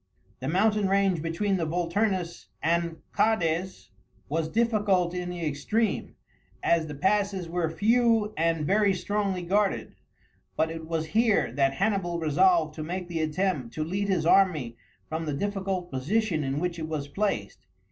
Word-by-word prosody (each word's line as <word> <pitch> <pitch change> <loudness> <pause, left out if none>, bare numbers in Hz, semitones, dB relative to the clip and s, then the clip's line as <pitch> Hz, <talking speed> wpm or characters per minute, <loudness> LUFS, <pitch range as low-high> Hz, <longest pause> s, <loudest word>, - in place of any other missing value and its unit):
The 130 - -4
mountain 205 +5 +2
range 195 -4 +2
between 190 +5 0
the 165 -3 -1
Vulturnus 180 +1 -1 0.2
and 170 0 0
Cades 185 -4 0 0.4
was 160 +1 -1
difficult 205 -5 +2
in 180 0 -3
the 175 -2 -4
extreme, 155 +10 -1 0.5
as 165 -2 +2
the 150 - -6
passes 195 +2 0
were 170 -1 -1
few 225 +2 +2
and 165 -1 +1
very 200 +2 +3
strongly 195 -1 -1
guarded, 200 +3 0 0.6
but 160 +1 +1
it 165 -1 -7
was 165 -1 -1
here 220 - +2
that 135 +1 +1
Hannibal 195 -3 0
resolved 165 0 +3
to 155 - -6
make 180 +2 -4
the 165 -1 -2
attempt 155 -6 -1
to 155 - -1
lead 195 +5 -2
his 180 -5 +1
army 165 -11 +3 0.3
from 160 0 -4
the 150 - -1
difficult 195 0 -2
position 160 +5 0
in 135 +1 -1
which 175 0 -2
it 160 - -4
was 155 -3 -3
placed. 145 - -3
175 Hz, 155 wpm, -27 LUFS, 160-200 Hz, 0.6 s, very